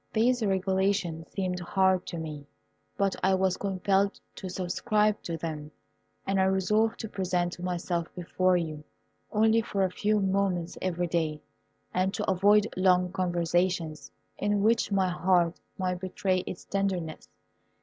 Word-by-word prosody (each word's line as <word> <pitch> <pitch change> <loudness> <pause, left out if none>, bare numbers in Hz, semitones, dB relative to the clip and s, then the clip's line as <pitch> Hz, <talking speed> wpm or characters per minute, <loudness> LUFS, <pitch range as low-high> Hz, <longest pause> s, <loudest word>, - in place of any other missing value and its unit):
These 245 +2 +3
regulations 190 -3 0
seemed 185 -2 -2
hard 190 +1 +2
to 170 - -5
me, 150 -3 -6 0.5
but 195 -1 +1
I 190 +1 +3
was 190 -1 +1
compelled 195 0 0
to 190 - -7
subscribe 210 +4 0
to 165 -1 -4
them, 155 -2 -5 0.6
and 195 0 +1
I - - +4
resolved 210 +4 +2
to 220 - -4
present 180 -3 -1
myself 175 -1 -2
before 180 +1 +1
you 155 -3 -4 0.5
only 220 +1 +4
for 200 -2 -1
a 185 - +1
few 210 +3 +1
moments 190 -3 0
every 180 -1 -1
day, 160 -3 -1 0.5
and 185 +1 +1
to - - -3
avoid 200 +3 +4
long 180 -1 +3
conversations, 175 -3 0 0.3
in 205 0 +1
which 225 0 +2
my 190 -2 +2
heart 175 -1 +2 0.2
might 180 -1 -1
betray 185 0 0
its 175 - -6
tenderness. 190 -5 -2
185 Hz, 140 wpm, -28 LUFS, 175-195 Hz, 0.6 s, I